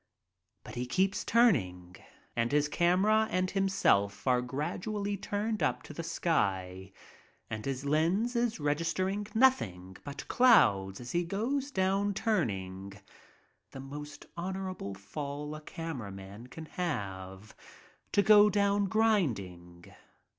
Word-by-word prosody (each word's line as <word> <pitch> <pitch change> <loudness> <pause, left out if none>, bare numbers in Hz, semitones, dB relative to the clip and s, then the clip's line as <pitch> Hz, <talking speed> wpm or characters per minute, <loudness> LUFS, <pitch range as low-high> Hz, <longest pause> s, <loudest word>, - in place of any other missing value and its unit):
But - - -10
he 125 +1 -3
keeps 190 +8 +1
turning, 95 - +2 0.4
and 115 0 0
his 150 0 +3
camera 190 +8 +3
and 185 0 0
himself 185 - +1
are 125 -2 +3
gradually 195 +11 -3
turned 210 +2 -2
up - - 0
to - - -10
the 170 - -5
sky, 100 - -1 0.6
and 110 0 -4
his 135 0 -3
lens 170 - +1
is 235 -4 0
registering 165 +7 -1
nothing 95 - +2
but 140 -1 -7
clouds 100 - +4
as 125 0 -7
he 175 0 +1
goes 240 +10 -2
down 195 -3 0
turning 100 - -2 0.4
— - - -37
the 135 - -7
most 145 +2 -8
hon 180 +3 -3
orable 185 - -5
fall 145 +8 -6
a 155 - -7
camera 150 -10 -6
man 100 +4 -10
can 160 +5 -9
have, 100 - -5 0.6
to 200 - +3
go 210 0 +7
down 200 0 +2
grinding. 105 - 0
155 Hz, 130 wpm, -31 LUFS, -, 0.6 s, go